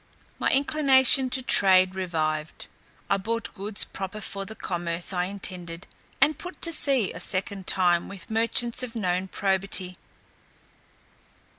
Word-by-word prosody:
My -, -, +1 dB
inclination 270 Hz, -2 st, +4 dB
to 255 Hz, +1 st, +1 dB
trade 185 Hz, -5 st, +4 dB
revived. 160 Hz, -4 st, -3 dB, 0.4 s
I 195 Hz, -, +2 dB
bought 230 Hz, +4 st, -4 dB
goods 200 Hz, +2 st, -4 dB
proper 195 Hz, +2 st, -7 dB
for 195 Hz, -1 st, -6 dB
the 220 Hz, -, -9 dB
commerce 175 Hz, -1 st, -3 dB
I 180 Hz, -1 st, 0 dB
intended, 180 Hz, -3 st, -8 dB, 0.3 s
and 305 Hz, -, +3 dB
put 360 Hz, +1 st, -9 dB
to 335 Hz, -, +3 dB
sea 270 Hz, -9 st, +1 dB
a 165 Hz, -, -8 dB
second 190 Hz, +1 st, -2 dB
time 175 Hz, -2 st, +3 dB
with 195 Hz, 0 st, -9 dB
merchants 230 Hz, +2 st, +2 dB
of 250 Hz, -2 st, -4 dB
known 185 Hz, -3 st, -1 dB
probity. 190 Hz, -2 st, 0 dB
195 Hz, 135 wpm, -25 LUFS, 180-230 Hz, 0.4 s, inclination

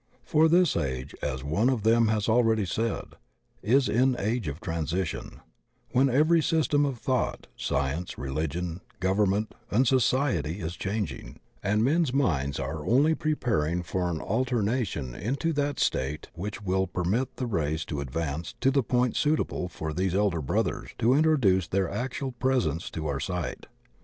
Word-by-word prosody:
For 155 Hz, +2 st, +4 dB
this 175 Hz, 0 st, +4 dB
age, 65 Hz, -1 st, -2 dB
as 65 Hz, -2 st, -3 dB
one 85 Hz, -, +2 dB
of 125 Hz, -6 st, 0 dB
them 115 Hz, +1 st, +4 dB
has 110 Hz, -1 st, 0 dB
already 110 Hz, -2 st, +3 dB
said, 110 Hz, +5 st, -2 dB, 0.5 s
''is 130 Hz, +6 st, +3 dB
an 130 Hz, +2 st, +3 dB
age 110 Hz, -1 st, -1 dB
of 75 Hz, +2 st, -4 dB
transition," 80 Hz, +1 st, -3 dB, 0.5 s
when 135 Hz, +2 st, +4 dB
every 155 Hz, +6 st, +4 dB
system 150 Hz, -2 st, +2 dB
of 135 Hz, -3 st, -3 dB
thought, 130 Hz, +1 st, -1 dB
science, 75 Hz, +6 st, -2 dB
religion, 80 Hz, +6 st, -3 dB, 0.2 s
government, 100 Hz, +2 st, +1 dB, 0.2 s
and 125 Hz, +4 st, +3 dB
society 120 Hz, -, +1 dB
is 85 Hz, 0 st, -4 dB
changing, 100 Hz, -, -4 dB, 0.2 s
and 105 Hz, +2 st, +1 dB
men's 150 Hz, +1 st, +2 dB
minds 70 Hz, -, +1 dB
are 75 Hz, +3 st, -4 dB
only 140 Hz, -, +4 dB
pre 155 Hz, -1 st, 0 dB
paring 90 Hz, -, 0 dB
for 90 Hz, +1 st, -1 dB
an 80 Hz, -2 st, -2 dB
alteration 115 Hz, -, -1 dB
into 140 Hz, -, -1 dB
that 145 Hz, 0 st, -1 dB
state 70 Hz, +4 st, -1 dB
which 105 Hz, +5 st, -6 dB
wiQ 95 Hz, 0 st, 0 dB
per 90 Hz, -, -1 dB
mit 115 Hz, +9 st, 0 dB
the 130 Hz, -, -3 dB
race 80 Hz, -7 st, -1 dB
to 75 Hz, -3 st, -4 dB
advance 75 Hz, +3 st, -4 dB
to 135 Hz, -, +3 dB
the 140 Hz, 0 st, +3 dB
point 125 Hz, 0 st, +1 dB
suitable 150 Hz, -11 st, 0 dB
for 80 Hz, -3 st, -5 dB
these 95 Hz, +2 st, 0 dB
elder 100 Hz, -5 st, +1 dB
brothers 65 Hz, -, -1 dB
to 120 Hz, +3 st, +3 dB
introduce 130 Hz, -, +3 dB
their 95 Hz, -1 st, +1 dB
actual 130 Hz, +4 st, -3 dB
presence 120 Hz, -, 0 dB
to 80 Hz, -, -5 dB
our 70 Hz, -2 st, -1 dB
sight. 90 Hz, +2 st, -4 dB
100 Hz, 160 wpm, -27 LUFS, 80-130 Hz, 0.5 s, For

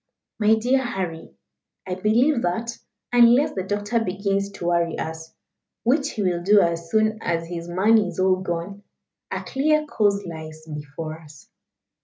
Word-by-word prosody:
My 215 Hz, +1 st, +5 dB
dear 250 Hz, +4 st, +1 dB
Harry, 185 Hz, -9 st, -5 dB, 0.5 s
I 185 Hz, -, -3 dB
believe 235 Hz, +8 st, +2 dB
that, 230 Hz, +6 st, -2 dB, 0.4 s
unless 240 Hz, +3 st, +5 dB
the 190 Hz, -, -2 dB
doctor 205 Hz, +4 st, -1 dB
begins 200 Hz, 0 st, -1 dB
to 175 Hz, -, -7 dB
worry 170 Hz, -1 st, +1 dB
us 160 Hz, 0 st, -6 dB, 0.5 s
which 280 Hz, +5 st, +1 dB
he 210 Hz, -, -2 dB
will 175 Hz, -2 st, 0 dB
do 205 Hz, +3 st, +5 dB
as 170 Hz, -2 st, 0 dB
soon 215 Hz, +2 st, +2 dB
as 165 Hz, -1 st, -1 dB
his 170 Hz, 0 st, -6 dB
money 205 Hz, +4 st, +3 dB
is 180 Hz, 0 st, -7 dB
all 185 Hz, 0 st, +3 dB
gone 185 Hz, +2 st, -4 dB, 0.5 s
a -, -, -4 dB
clear 305 Hz, +3 st, +1 dB
course 205 Hz, -7 st, +1 dB
lies 155 Hz, -2 st, -8 dB
before 155 Hz, +1 st, -6 dB
us. 150 Hz, -4 st, -16 dB
190 Hz, 155 wpm, -23 LUFS, 170-220 Hz, 0.5 s, My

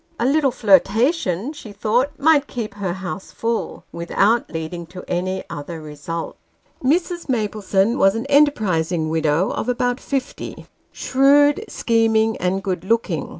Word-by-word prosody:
A 235 Hz, -, +1 dB
little 280 Hz, +1 st, +3 dB
flirtation, 220 Hz, -, +2 dB
she 230 Hz, -8 st, -10 dB
thought, 235 Hz, +6 st, +1 dB
might 295 Hz, -1 st, +4 dB
keep 220 Hz, -4 st, -5 dB
her 195 Hz, -4 st, -3 dB
Bouse 185 Hz, +1 st, -5 dB
full, 230 Hz, 0 st, -3 dB
without 200 Hz, +7 st, +1 dB
leading 165 Hz, +1 st, -5 dB
to 180 Hz, +1 st, -10 dB
any 185 Hz, +2 st, -2 dB
other 160 Hz, +3 st, -7 dB
result. 155 Hz, +2 st, -6 dB, 0.5 s
Mrs. 340 Hz, +4 st, 0 dB
Maplesone 210 Hz, -2 st, 0 dB
was 195 Hz, +2 st, +4 dB
an 225 Hz, -, -3 dB
enterprising 185 Hz, -, +2 dB
widow 160 Hz, +3 st, +1 dB
of 250 Hz, -, -3 dB
about 245 Hz, +1 st, 0 dB
fifty: 270 Hz, -2 st, -5 dB, 0.3 s
shrewd, 285 Hz, +7 st, +3 dB
scheming, 225 Hz, -1 st, +2 dB
and 185 Hz, +2 st, -1 dB
good 180 Hz, -3 st, -2 dB
looking. 190 Hz, -, -1 dB
215 Hz, 135 wpm, -21 LUFS, 180-255 Hz, 0.5 s, might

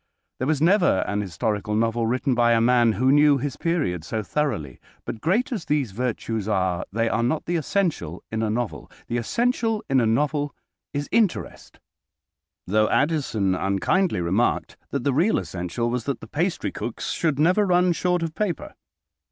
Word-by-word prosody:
There 130 Hz, -, -1 dB
was 155 Hz, -2 st, +1 dB
never 175 Hz, -, +4 dB
an 105 Hz, 0 st, -1 dB
historical 105 Hz, +3 st, -2 dB
novel 115 Hz, +1 st, +1 dB
written 130 Hz, +3 st, 0 dB
by 120 Hz, -1 st, +4 dB
a 115 Hz, -, +4 dB
man 120 Hz, -1 st, +4 dB
who 130 Hz, +4 st, +2 dB
knew 145 Hz, 0 st, +5 dB
his 135 Hz, 0 st, -3 dB
period 155 Hz, -, -1 dB
so 110 Hz, +5 st, -3 dB
thoroughly. 95 Hz, -, -2 dB, 0.3 s
But, 110 Hz, -, -6 dB
great 225 Hz, -, +1 dB
as 215 Hz, -9 st, -3 dB
these 145 Hz, -7 st, 0 dB
virtues 110 Hz, -1 st, -3 dB
are, 95 Hz, -4 st, 0 dB
they 115 Hz, +3 st, 0 dB
are 115 Hz, -, 0 dB
not 130 Hz, +6 st, 0 dB
the 175 Hz, -, -1 dB
essential 155 Hz, -, -1 dB
in 110 Hz, 0 st, -1 dB
a 110 Hz, -, 0 dB
novel. 115 Hz, +1 st, -3 dB, 0.2 s
The 120 Hz, -, -2 dB
essential 225 Hz, -, 0 dB
in 135 Hz, -2 st, +3 dB
a 115 Hz, -, +2 dB
novel 145 Hz, +5 st, 0 dB, 0.4 s
is 145 Hz, 0 st, -3 dB
interest, 220 Hz, -6 st, -1 dB, 0.9 s
though 110 Hz, +3 st, +2 dB
Addison 135 Hz, -, +1 dB
unkindly 100 Hz, -, +1 dB
remarked 95 Hz, +8 st, 0 dB
that 140 Hz, -3 st, -3 dB
the 140 Hz, -, +1 dB
real 175 Hz, +11 st, +3 dB
essential 90 Hz, +7 st, -3 dB
was 125 Hz, -2 st, -2 dB
that 140 Hz, -, -2 dB
the 115 Hz, -, -11 dB
pastrycooks 160 Hz, -, -3 dB
should 155 Hz, -5 st, 0 dB
never 180 Hz, +7 st, +4 dB
run 180 Hz, 0 st, +3 dB
short 180 Hz, 0 st, 0 dB
of 165 Hz, -1 st, -3 dB
paper. 195 Hz, -2 st, -3 dB
125 Hz, 170 wpm, -24 LUFS, 110-165 Hz, 0.9 s, knew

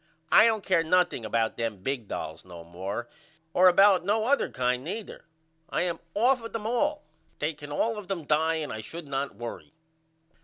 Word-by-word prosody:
I -, -, +8 dB
don't 220 Hz, -3 st, 0 dB
care 185 Hz, -4 st, +2 dB
nothing 175 Hz, -7 st, +2 dB
about 110 Hz, +1 st, 0 dB
them 110 Hz, -5 st, -3 dB
big 130 Hz, -4 st, -2 dB
dolls 80 Hz, -3 st, -5 dB
no 85 Hz, -2 st, -11 dB
more 95 Hz, +7 st, -5 dB, 0.5 s
or 185 Hz, +1 st, +6 dB
about 190 Hz, 0 st, +6 dB
no 215 Hz, +3 st, +1 dB
other 280 Hz, +4 st, +2 dB
kind 125 Hz, 0 st, -1 dB
neither. 200 Hz, +7 st, -6 dB, 0.4 s
I -, -, 0 dB
am 175 Hz, -2 st, -2 dB, 0.2 s
off 245 Hz, +3 st, +3 dB
of 230 Hz, -, -8 dB
them 225 Hz, -2 st, -4 dB
all. 295 Hz, +6 st, 0 dB, 0.3 s
They 155 Hz, +2 st, -1 dB
can 145 Hz, 0 st, -10 dB
all 220 Hz, +8 st, 0 dB
of 200 Hz, -, -10 dB
them 180 Hz, -5 st, -4 dB
die 160 Hz, +2 st, +2 dB
and 155 Hz, -2 st, -3 dB
I 110 Hz, -, -5 dB
should 165 Hz, +8 st, -8 dB
not 140 Hz, 0 st, -3 dB
worry. 120 Hz, +6 st, -8 dB
160 Hz, 190 wpm, -27 LUFS, -, 0.5 s, I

